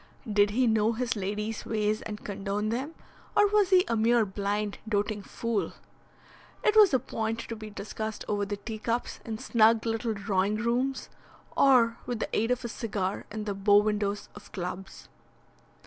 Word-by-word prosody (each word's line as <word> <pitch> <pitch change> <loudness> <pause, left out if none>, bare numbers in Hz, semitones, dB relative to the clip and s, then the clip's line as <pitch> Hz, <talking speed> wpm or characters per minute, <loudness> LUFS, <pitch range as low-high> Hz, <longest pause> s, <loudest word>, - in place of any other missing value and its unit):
Did 205 -1 +3
he 250 +5 +2
know 220 0 +3
his 235 0 -1
lady's 210 +2 -3
ways 215 0 0
and 210 -1 -7
condone 200 +1 -2
them, 265 +8 -3 0.4
or 415 - +7
was 410 -2 +3
he 370 -1 +5
a 230 - 0
mere 230 +1 +3
blind, 205 +1 -2
doting 205 0 0
fool? 230 +2 -2 0.9
It 425 - +3
was 425 -3 +8
a 265 - +4
point 225 -2 -3
to 230 - -6
be 215 -1 -8
discussed 215 +1 -5
over 205 -1 0
the 200 0 -3
teacups 225 +3 -3
in 220 -1 -4
snug 225 -2 +3
little 225 0 -1
drawing 200 0 0
rooms, 245 +4 -1 0.5
or 240 -4 +5
with 245 - -2
the - - -3
aid 225 +2 +1
of 250 0 0
a - - 0
cigar 205 -4 -3
in 215 0 -4
the 205 -1 -2
bow 200 +1 +4
windows 205 -1 0
of 205 - -13
clubs. 190 +1 -6
215 Hz, 170 wpm, -28 LUFS, 205-235 Hz, 0.9 s, was